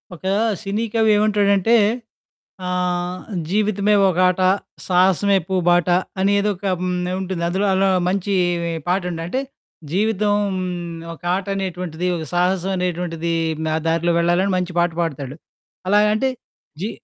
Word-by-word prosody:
ఒకా 190 Hz, +3 st, -3 dB, 0.3 s
సినీ 205 Hz, +2 st, -2 dB
కవేవంటాడంటే, 210 Hz, -2 st, +3 dB, 0.9 s
ఆహ్, 180 Hz, 0 st, -2 dB, 0.3 s
'జీవితమే 210 Hz, +1 st, +1 dB, 0.2 s
ఒక 180 Hz, -, -2 dB
ఆట, 180 Hz, +1 st, 0 dB, 0.5 s
సాహసమే 190 Hz, +2 st, +3 dB
పూ 190 Hz, -, -1 dB
బాట' 175 Hz, 0 st, +3 dB, 0.3 s
అనేదోక 200 Hz, 0 st, +1 dB, 0.2 s
హ్మ్. 180 Hz, 0 st, -1 dB, 0.3 s
ఉంటుంది. 185 Hz, -2 st, -3 dB
అందులో 190 Hz, +4 st, 0 dB
అలా 190 Hz, +1 st, +3 dB, 0.2 s
మంచీ 195 Hz, +1 st, 0 dB, 0.5 s
పాటుండంటే, 180 Hz, +3 st, -1 dB, 0.5 s
జీవితం 210 Hz, +2 st, +1 dB, 0.8 s
ఒకాటనేటువంటిదీ, 180 Hz, -1 st, -3 dB
ఒక 160 Hz, -, -5 dB
సాహసవనేటువంటిదీ, 180 Hz, -2 st, -1 dB, 0.3 s
నా 155 Hz, -, 0 dB
దారిలో 165 Hz, +1 st, +1 dB
వెళ్ళాలని 175 Hz, +3 st, +2 dB
మంచి 180 Hz, 0 st, -2 dB
పాట 175 Hz, 0 st, +2 dB
పాడతాడు. 140 Hz, -4 st, -4 dB, 0.5 s
అలాగంటే, 210 Hz, +5 st, +3 dB, 0.5 s
జీ 205 Hz, -, -1 dB
185 Hz, 100 wpm, -21 LUFS, 175-200 Hz, 0.9 s, కవేవంటాడంటే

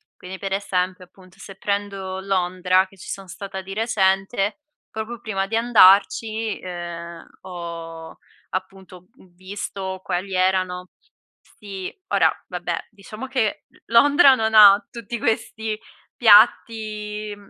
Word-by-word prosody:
quindi 185 Hz, +1 st, -9 dB
per 195 Hz, 0 st, -4 dB
esempio, 185 Hz, -2 st, -2 dB
appunto 185 Hz, +1 st, -21 dB
se 195 Hz, 0 st, -11 dB
prendo 195 Hz, -1 st, -3 dB
Londra, 185 Hz, -1 st, +1 dB
che 195 Hz, -, -21 dB
ci -, -, -11 dB
sono 195 Hz, -1 st, -6 dB
stata 190 Hz, +2 st, -7 dB
di 195 Hz, +1 st, -9 dB
recente, 195 Hz, 0 st, 0 dB, 0.3 s
proprio 220 Hz, +2 st, -6 dB
prima 195 Hz, -3 st, -2 dB
di 225 Hz, -, -3 dB
andarci, 220 Hz, 0 st, +4 dB
ehm, 170 Hz, -1 st, -7 dB, 0.2 s
ho 165 Hz, -2 st, -8 dB, 0.3 s
appunto 185 Hz, -1 st, -7 dB
v -, -, -20 dB
visto 190 Hz, 0 st, -6 dB
quali 190 Hz, +2 st, -3 dB
erano 185 Hz, -1 st, 0 dB, 0.7 s
sì, 195 Hz, -3 st, -7 dB, 0.2 s
ora -, -, +3 dB, 0.2 s
vabbè -, -, -4 dB
diciamo 215 Hz, +4 st, -9 dB
che 255 Hz, -5 st, -1 dB
l -, -, -25 dB
Londra 275 Hz, +3 st, +6 dB
non 220 Hz, -2 st, -1 dB
ha 205 Hz, -1 st, +8 dB
tutti 235 Hz, 0 st, -6 dB
questi 220 Hz, -1 st, -2 dB, 0.4 s
piatti 215 Hz, -1 st, +3 dB
195 Hz, 125 wpm, -22 LUFS, 185-215 Hz, 0.7 s, ha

